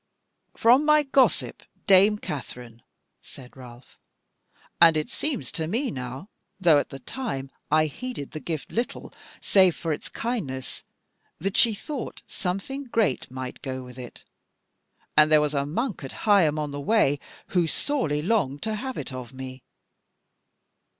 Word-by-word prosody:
"From 245 +5 +5
my 300 0 +5
gossip, 270 -1 +2 0.2
dame 200 +2 +6
Katherine," 125 - -7 0.4
said 125 -2 -13
Ralph; 125 -1 -14 0.8
"and 165 -2 +8
it 155 - -2
seems 295 -5 -2
to 160 -2 -3
me 240 - -1
now, 130 +5 -6 0.3
though 165 -6 +6
at - - -3
the 135 - -7
time 135 - -5 0.2
I 155 +1 +4
heeded 190 - -6
the 155 - -6
gift 155 -3 -5
little 235 +2 -3 0.3
save 185 -4 +5
for 165 -2 -2
its - - -6
kindness, 170 - -4 0.5
that 195 +4 -2
she 230 -3 +5
thought 260 +2 -6
something 205 +8 -4
great 225 - 0
might 130 0 -7
go 130 -2 -5
with 125 0 -11
it; 125 -1 -10 0.9
and 155 0 +6
there 155 - +7
was 150 0 0
a 140 -1 0
monk 220 - -2
at 135 - -7
Higham 185 -8 +4
on 150 -1 -2
the 145 0 -5
Way, 145 -6 +3 0.3
who 175 -3 +2
sorely 160 - 0
longed 165 -9 0
to 220 - -1
have 260 +4 -4
it 135 - -5
of 125 0 -7
me." 130 0 -8
155 Hz, 150 wpm, -26 LUFS, 135-225 Hz, 0.9 s, and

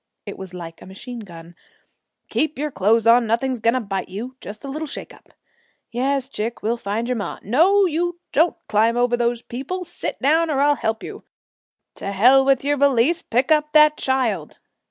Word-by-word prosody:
It - - -7
was 190 -1 -9
like 165 -2 -9
a - - -12
machine 240 +6 -9
gun: 170 -5 -11 0.8
'Keep 310 0 -1
your 300 +2 -2
clothes 220 +2 +2
on, 235 0 +5
nothing's 245 +3 0
going 230 +3 +2
to - - +1
bite 195 -5 -4
you 230 +7 -6
just 215 +6 -9
a - - -6
little 305 +3 -4
shake - - -8
up - - -20 0.6
Yes, 265 +2 -1
chick, 230 -4 -5
we'll 225 +2 +1
find 220 +2 -3
your 250 - 0
ma 205 -5 -4
No, 360 - +4
you 345 +1 -1
don't 325 +4 +2
climb 220 +2 +2
over 245 0 +2
those 240 0 -1
people; 280 +10 -5
sit 345 - -5
down 320 +4 +2
or 280 -3 0
I'll 290 +1 +4
help 220 -5 -2
you - - -8 0.7
To 195 - -4
hell 250 +7 +5
with 270 -1 +2
your 290 0 +1
valise, 280 +4 +3
pick 250 +5 0
up 300 -1 +2
that 305 0 +6
child! 235 - -1
245 Hz, 195 wpm, -21 LUFS, 220-290 Hz, 0.8 s, that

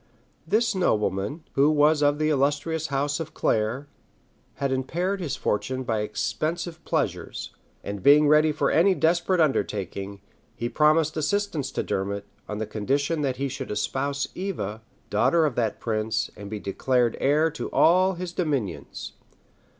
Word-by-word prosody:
This 220 +6 +2
nobleman, 105 - 0
who 140 +2 +4
was 150 0 +4
of 145 0 +3
the 155 0 +1
illustrious 145 +3 0
house 145 +2 -1
of 160 -2 -6
Clare, 110 +6 0 0.7
had 140 -1 -1
impaired 175 +9 -1
his 155 -7 -2
fortune 130 +5 -1
by 115 -3 -1
expensive 160 +10 -3
pleasures; - - -2 0.3
and 100 -1 -5
being 150 +4 +6
ready 155 +1 +5
for 150 - 0
any 185 +4 +4
desperate 175 +2 +2
undertaking, 100 - -1 0.4
he 120 - -3
promised 155 +2 +3
assistance 155 -4 -1
to - - -1
Dermot, 100 +1 -2 0.2
on 105 +1 -3
condition 140 +9 -1
that 130 -3 -1
he 140 +1 -1
should 130 0 -6
espouse 140 +6 -1
Eva, 115 - -4 0.3
daughter 170 -2 +3
of 145 - 0
that 115 -3 -1
prince, 110 -1 -1
and 100 -1 -9
be 105 0 -4
declared 120 +4 +1
heir 150 +4 +3
to - - -5
all 185 +3 +4
his 175 0 -5
dominions. 140 - -3
145 Hz, 145 wpm, -25 LUFS, 110-160 Hz, 0.7 s, being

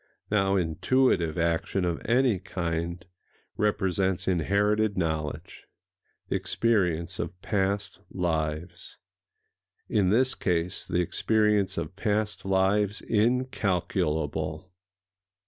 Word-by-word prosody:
Now 95 -2 +2
intuitive 90 0 +1
action 85 +2 0
of 85 -1 -2
any 120 -4 +3
kind 85 -1 -3 0.5
represents 95 -3 0
inherited 100 +4 +1
knowledge, 80 -2 -3 0.6
the - - -1
experience 90 -6 0
of 90 - -4
past 100 -1 -1
lives,—in 90 - -4
this 130 +6 +3
case 90 -1 -1
the 90 - 0
experience 105 +3 +1
of 85 +1 -4
past 105 0 -1
lives 95 +2 +2
incalculable. 95 -8 0
95 Hz, 85 wpm, -27 LUFS, 85-105 Hz, 0.6 s, any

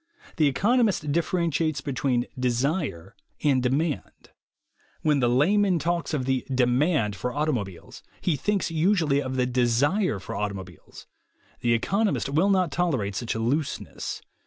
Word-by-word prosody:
The 155 -3 +4
economist 205 - +2
differentiates 165 -1 0
between 125 -3 -1
"desire" 125 - -1 0.3
and 135 -4 +3
"demand." 140 +5 -2 0.7
When 150 -2 +3
the 120 -2 +2
layman 185 +9 +3
talks 170 +1 -1
of 145 -5 -1
the 130 -1 0
demand 125 - +2
for 125 +5 -3
auto 155 +1 +1
mobiles, 100 - -6 0.2
he 175 - 0
thinks 195 +5 -1
usually 160 -4 +2
of 130 -1 -4
the 125 -1 +2
desire 125 - +1
for 95 - -7
auto 105 -1 -2
mobiles. 90 -4 -11 0.5
The 120 -1 +2
economist 195 - 0
will 160 +8 +2
not 185 -4 +2
tolerate 135 - 0
such 120 +3 -3
looseness. 130 +7 -3
140 Hz, 135 wpm, -26 LUFS, 125-170 Hz, 0.7 s, The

